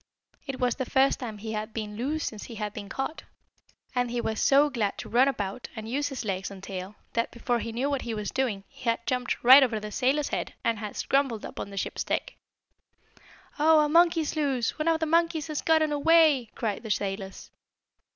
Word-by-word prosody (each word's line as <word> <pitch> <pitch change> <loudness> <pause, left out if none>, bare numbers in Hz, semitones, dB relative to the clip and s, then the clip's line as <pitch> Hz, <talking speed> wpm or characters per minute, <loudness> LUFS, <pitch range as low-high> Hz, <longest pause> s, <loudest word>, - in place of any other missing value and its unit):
It 270 -1 -4
was 250 -2 +2
the 260 -3 -3
first 270 0 +3
time 230 -5 -6
he 220 +2 -6
had 215 +1 -4
been 210 -2 -4
loose 290 +8 -2
since 215 -2 -5
he 235 - -9
had 210 -1 -4
been 205 -2 -7
caught, 270 +8 -4 0.7
and 245 -1 0
he 240 0 -2
was 220 -2 -2
so 280 +2 +5
glad 215 -6 -1
to - - -7
run 250 +3 +4
about, 205 -3 -3
and 220 -1 -6
use 285 +5 -1
his 265 -4 -5
legs 190 -2 -2
and 195 -1 -11
tail, 195 +1 -6 0.2
that, 230 0 0
before 240 0 -1
he 230 - -4
knew 245 +5 -1
what 280 -2 -1
he 230 -2 -4
was 210 -2 -4
doing, 235 -7 -1
he - - -15
had 230 0 -1
jumped 250 -1 -1
right 260 +3 +10
over 235 -5 +2
the 210 0 -7
sailor's 270 +5 +1
head, - - -3
and 230 -2 0
had 210 -1 -6
scrambled 270 -6 0
up - - -8
on - - -5
the 200 - -10
ship's - - -2
deck. - - -2 1.3
"Oh, 310 +1 +6
a 300 - +2
monkey's 330 -1 +3
loose! 275 -4 0
One 305 - -1
of 325 -1 +3
the - - +2
monkeys 330 -1 +2
has 305 - -2
gotten 315 -1 +3
away!" 295 -4 +4
cried 215 -4 -2
the 220 - -8
sailors. 195 -1 -3
245 Hz, 220 wpm, -27 LUFS, 215-285 Hz, 1.3 s, right